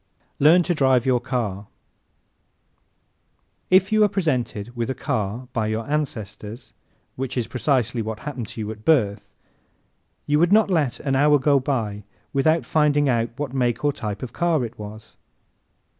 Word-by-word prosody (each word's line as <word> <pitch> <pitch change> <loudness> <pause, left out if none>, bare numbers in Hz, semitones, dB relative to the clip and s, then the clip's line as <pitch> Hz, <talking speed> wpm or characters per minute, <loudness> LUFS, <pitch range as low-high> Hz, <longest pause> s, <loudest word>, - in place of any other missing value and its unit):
Learn 165 +5 +6
to 175 - 0
Drive 130 -5 +3
Your 130 -2 +3
Car 120 -6 -3
¶ - - -21 2.0
If 190 +2 +4
you 215 - +3
were 210 - +6
presented 125 - -2
with 120 0 -2
a 130 - -2
car 120 0 -3
by 110 -2 0
your 110 +1 -3
ancestors 115 -6 -4 0.4
which 130 0 -4
is 120 - 0
precisely 125 -1 0
what 110 0 -5
happened 130 -7 -5
to - - -8
you 105 0 -4
at 110 0 -11
birth 110 -10 +1 0.9
you 150 +1 +2
would 175 +2 +3
not 210 -1 +4
let 150 -8 +1
an 135 -2 0
hour 145 +2 +5
go 140 +1 +3
by 110 -7 -2 0.3
without 155 +4 +2
finding 145 -2 +2
out 115 -2 +1
what 140 -3 -4
make 125 0 0
or 145 - +2
type 105 -5 -5
of 125 - -6
car 165 -7 +1
it 115 0 -10
was. 105 +1 -10
130 Hz, 165 wpm, -23 LUFS, 110-150 Hz, 2.0 s, Learn